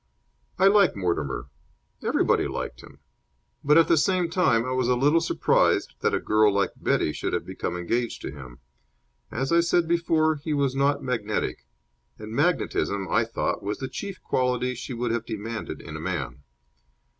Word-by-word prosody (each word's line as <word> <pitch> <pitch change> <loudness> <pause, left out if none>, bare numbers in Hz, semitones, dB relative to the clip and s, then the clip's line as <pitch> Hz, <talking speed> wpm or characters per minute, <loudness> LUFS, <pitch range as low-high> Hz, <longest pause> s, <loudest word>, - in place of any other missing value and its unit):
I 190 - +3
like 200 -1 +5
Mortimer. 85 -8 -2 0.5
Everybody - - +2
liked - - -5
him. - - -15 0.7
But, 150 +2 +5
at 165 - +6
the 170 - +4
same 180 +1 +1
time, 120 -10 +2
I 130 - -3
was 130 -1 0
a 125 - +3
little 145 +6 +3
surprised 165 - +2
that - - +1
a - - 0
girl 110 0 +3
like 100 0 +1
Betty 75 - 0
should - - -3
have - - -1
become 90 - -4
engaged 115 +7 -2
to - - -4
him. 65 -4 -11 0.7
As 135 +5 -2
I 170 - +5
said 170 0 +2
before, 160 -2 +2
he 150 +1 -3
was 140 -2 0
not 140 +1 +1
magnetic; 115 -5 -2 0.5
and 110 0 -9
magnetism, 115 - 0
I 115 +5 +2
thought, 115 - -2
was 105 +1 -3
the 130 - -4
chief 195 +8 -6
quality 125 0 0
she 125 +2 -7
would 120 0 -1
have 115 -1 -1
demanded 110 0 -5
in - - -9
a - - -5
man. 70 - -4
125 Hz, 175 wpm, -25 LUFS, 110-160 Hz, 0.7 s, at